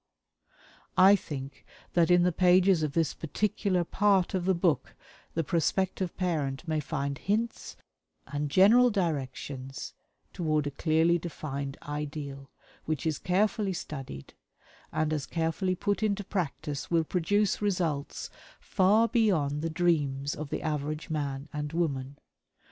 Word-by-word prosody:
I 190 +2 +8
think 140 -7 -7 0.3
that 170 -2 +3
in 175 0 +5
the 180 - +3
pages 180 0 +4
of 150 -2 -1
this 165 -2 +1
particular 190 +2 0
part 195 +1 +2
of 185 -2 -1
the 190 0 +3
book 170 -3 0 0.4
the 165 - +1
prospective 180 +3 0
parent 155 -5 -1
may 155 -1 0
find 140 -2 -3
hints 225 +4 -2 0.5
and 145 +1 -3
general 225 - +6
directions 135 - -3 0.4
toward 155 -3 0
a 145 - -2
clearly 160 +4 +2
defined 140 -4 -5
ideal, 145 -2 -5 0.4
which 155 -2 -2
is 155 -3 0
carefully 200 +2 +1
studied, 135 - -7 0.6
and 155 0 0
as 145 -3 -2
carefully 170 +3 -1
put 205 +3 -1
into 205 -1 0
practice 150 -6 -3
will 165 -1 +3
produce 195 +6 +1
results 175 -8 -1 0.3
far 210 +5 +3
beyond 165 - +1
the 165 - -1
dreams 145 -5 +1
of 150 -1 -6
the - - -3
average 150 0 -3
man 140 -2 -3
and 150 0 -4
woman. 140 -5 -2
160 Hz, 130 wpm, -29 LUFS, 145-185 Hz, 0.6 s, I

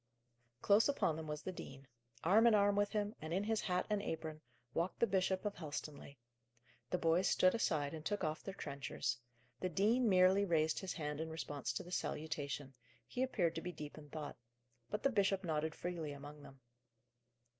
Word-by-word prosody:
Close 210 +6 +5
upon 185 - +2
them 160 0 -6
was 150 0 -4
the 185 - -3
dean. 135 -6 -9 0.4
Arm 215 +7 +6
in 225 - +6
arm 205 0 +4
with 205 0 +2
him, 210 0 0
in 170 +5 -1
his 220 0 +1
hat 180 -2 0
and 210 -1 0
apron, 160 -4 -4 0.3
walked 170 +3 -1
the - - +5
Bishop 190 -1 +1
of 205 - 0
Helstonleigh. 150 -3 -6 0.7
The 180 - +1
boys 170 +2 +3
stood 185 - +5
aside 155 -10 +1
and 155 -1 -6
took 205 +5 -1
off 155 0 -1
their 195 - -6
trenchers. 140 -7 -3 0.4
The 185 - -1
dean 220 +8 +3
merely 185 +1 +6
raised 160 -4 +2
his 190 -2 -3
hand 150 -1 -3
in 160 - -3
response 150 -3 -3
to - - -3
the 180 - -11
salutation 145 -5 -3 0.3
he 250 - -4
appeared 190 -11 +1
to 165 - -4
be 180 - -4
deep 150 -4 -8
in 150 -1 -11
thought; 150 0 -6 0.5
but 210 - -3
the 275 - +4
bishop 195 -3 +2
nodded 160 -2 -1
freely 170 -4 -3
among 145 +1 -9
them. 135 -2 -14
170 Hz, 190 wpm, -37 LUFS, 150-200 Hz, 0.7 s, Arm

